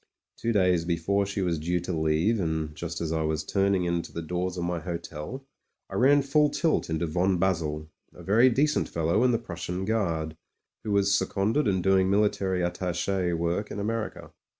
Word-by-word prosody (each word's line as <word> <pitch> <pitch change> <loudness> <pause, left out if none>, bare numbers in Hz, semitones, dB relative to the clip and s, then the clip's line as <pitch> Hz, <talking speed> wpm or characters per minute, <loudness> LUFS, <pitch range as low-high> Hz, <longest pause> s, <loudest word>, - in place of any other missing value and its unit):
Two 115 - -2
days 90 -5 +3
before 90 +4 0
she 100 -1 -2
was 85 -3 0
due 90 +3 0
to 90 +1 -4
leave, 80 +8 +1
and 80 -3 -2
just 85 +2 -5
as 80 -1 -2
I 80 -1 0
was 80 0 -1
turning 100 0 +1
into 85 -1 -2
the 85 - -5
doors 90 +2 -3
of 90 - -2
my 85 0 -1
hotel, 85 - -6 0.5
I - - -7
ran 140 +3 +4
full 150 +2 +3
tilt 160 - 0
into 80 +1 -1
von 90 +4 +1
Basel 80 -4 -1
— - - -45
a - - -13
very 115 +6 +5
decent 145 +5 +1
fellow 85 +7 +1
in 125 - +4
the 120 - +3
Prussian 90 -3 -5
Guard 85 -8 -1 0.2
— - - -58
^who 110 - -3
was 100 0 +3
seconded 110 +8 +1
and 95 -3 +1
doing 95 0 +3
military 100 -3 +1
attache 90 +1 -1
work 85 +5 -1
in - - -5
America. 110 +2 -4
90 Hz, 195 wpm, -27 LUFS, 85-105 Hz, 0.5 s, very